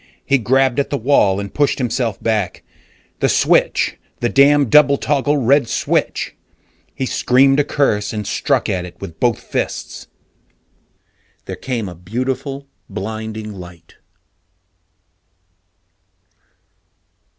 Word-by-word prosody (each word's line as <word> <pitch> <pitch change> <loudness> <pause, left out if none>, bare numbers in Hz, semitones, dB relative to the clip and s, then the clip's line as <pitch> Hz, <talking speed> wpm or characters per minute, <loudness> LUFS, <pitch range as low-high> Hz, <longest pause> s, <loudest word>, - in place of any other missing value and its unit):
He 140 - +3
grabbed 130 +3 +2
at 140 - 0
the 140 - -1
wall 110 -7 +3
and 100 -1 -6
pushed 145 -2 +1
himself 120 -5 -1
back. 110 -5 -1 0.6
The - - +2
switch - - +2 0.2
the 120 - 0
damn 140 +1 +5
double 140 +3 +5
toggle 145 +1 +1
red 135 0 +3
switch! - - -1 0.6
He 130 - -2
screamed 135 +2 +3
a - - +4
curse 105 -9 0
and 105 -1 -4
struck - - 0
at 90 -2 -1
it 90 - -11
with 85 -5 -9
both 120 -3 +1
fists. - - -4 1.4
There - - -5
came 120 -6 -4
a 90 - -7
beautiful, 130 - -4 0.2
blinding 110 +1 -5
light. 85 -3 -13
120 Hz, 115 wpm, -18 LUFS, 105-140 Hz, 1.4 s, damn